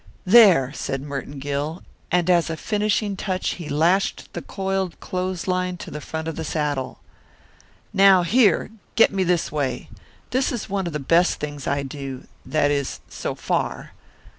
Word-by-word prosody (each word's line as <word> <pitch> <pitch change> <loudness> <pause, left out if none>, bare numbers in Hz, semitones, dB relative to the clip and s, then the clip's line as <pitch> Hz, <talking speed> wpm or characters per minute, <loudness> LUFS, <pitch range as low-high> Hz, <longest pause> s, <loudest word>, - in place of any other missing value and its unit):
"There!" 185 - +6
said 135 -2 -3
Merton 145 0 -6
Gill, 145 +4 -3 0.3
and 180 -1 +2
as 175 -2 +3
a 160 - -3
finishing 210 +1 0
touch 185 -1 -2
he 155 - -6
lashed 170 +7 +1
the - - -4
coiled 190 -2 -3
clothesline 185 0 -2
to - - -9
the 150 - -6
front 160 +2 -5
of 165 - -3
the 160 - -4
saddle. 145 -4 -2 1.0
"Now, 195 -2 +6
here! 210 +2 +3 0.2
Get 225 - +5
me 190 -1 +1
this 175 -2 +1
way. 135 -5 -2 0.4
This 260 +2 +1
is 235 -4 -4
one 195 -3 -2
of 170 - -5
the 150 - -2
best 170 +6 +3
things 145 -2 -5
I 140 0 0
do 135 -1 -7 0.2
that 150 -2 +2
is, 140 -2 -2
so - - -4
far." - - -2
170 Hz, 165 wpm, -23 LUFS, 145-190 Hz, 1.0 s, There